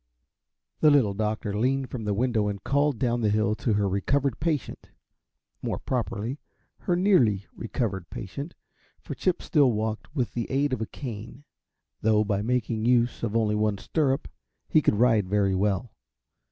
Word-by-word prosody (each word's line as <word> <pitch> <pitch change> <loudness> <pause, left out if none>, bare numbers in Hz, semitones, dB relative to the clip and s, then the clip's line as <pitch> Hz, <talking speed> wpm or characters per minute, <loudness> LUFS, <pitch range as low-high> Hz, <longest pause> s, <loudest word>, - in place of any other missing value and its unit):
The 155 - +6
Little 130 -9 +4
Doctor 105 0 -2
leaned 130 +4 0
from 115 -4 -5
the 105 - 0
window 115 -2 +1
and 100 -1 -4
called 140 +1 +1
down 120 0 0
the 110 - +2
hill 105 +1 +2
to 115 - 0
her 100 -1 +1
recovered 130 +7 0
patient 155 -3 -2 0.7
more - - -2
properly, 120 +1 -3 0.4
her 175 - 0
nearly 130 - +3
recovered 105 -6 -3
patient; 140 - -7 0.4
for - - -7
Chip 185 -2 -1
still 140 -6 +3
walked 110 +6 -3
with 125 -5 -1
the 120 -2 -3
aid 140 +1 +1
of 120 - -2
a 110 - -2
cane, 120 +1 -8 0.6
though 110 0 +3
by 100 -2 -1
making 115 -1 -1
use 120 0 +2
of 115 -1 0
only 110 -2 +1
one 105 -1 +1
stirrup 140 +6 0 0.4
he 155 - +4
could 110 - +2
ride 110 -4 +3
very 100 -1 +2
well. 100 +4 0
115 Hz, 165 wpm, -26 LUFS, 105-135 Hz, 0.7 s, The